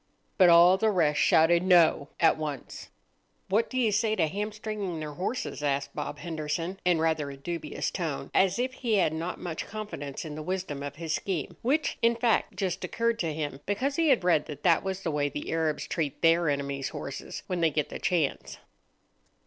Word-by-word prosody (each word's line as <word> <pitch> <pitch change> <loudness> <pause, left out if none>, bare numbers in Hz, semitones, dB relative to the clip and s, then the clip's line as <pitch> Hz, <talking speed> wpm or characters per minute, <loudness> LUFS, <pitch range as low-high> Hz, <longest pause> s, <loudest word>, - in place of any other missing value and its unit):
But 185 -2 +8
all 170 +2 +7
the 220 +3 +2
rest 160 -7 +2
shouted 170 +2 +5
"No" 170 -5 +4
at 165 - +5
once. 150 -4 -6 0.6
"What 215 +4 +2
do 255 - -4
you 235 -4 +3
say 215 +1 +1
to 180 - +2
ham 205 +7 -3
stringing 210 -5 -4
their 150 -1 -5
horses?" 185 - -3
asked 140 -1 -1
Bob 145 - -4
Henderson, 165 +3 -4
in 180 -2 +3
rather 160 -3 0
a 140 - -8
dubious 165 +2 -4
tone, 160 -6 -4
as 190 +1 +3
if 255 +1 -1
he 235 -4 -1
had 180 -6 +2
not 165 +3 -4
much 165 -2 -5
confidence 200 -10 -6
in 155 - -6
the 155 - -6
wisdom 180 -4 -3
of 145 0 -5
his 160 0 -3
scheme, 175 -6 -3
which, 290 +6 0
in 235 0 +4
fact, 230 -1 +1
just 185 -2 -2
occurred 230 0 -1
to 165 -2 -1
him 150 -3 -4
because 260 +8 0
he 330 -2 +3
had 255 -9 +4
read 170 -4 +2
that 150 - -8
that 170 -3 +4
was 190 0 -4
the 165 - -1
way 145 -1 0
the 145 +1 -5
Arabs 155 -2 0
treat 155 -5 -3
their 165 0 +4
enemies' 140 -1 -2
horses 140 - -7
when 180 -2 -2
they 165 - +4
get 150 -1 -1
the - - -6
chance. 165 -6 -1
170 Hz, 200 wpm, -28 LUFS, 150-195 Hz, 0.6 s, But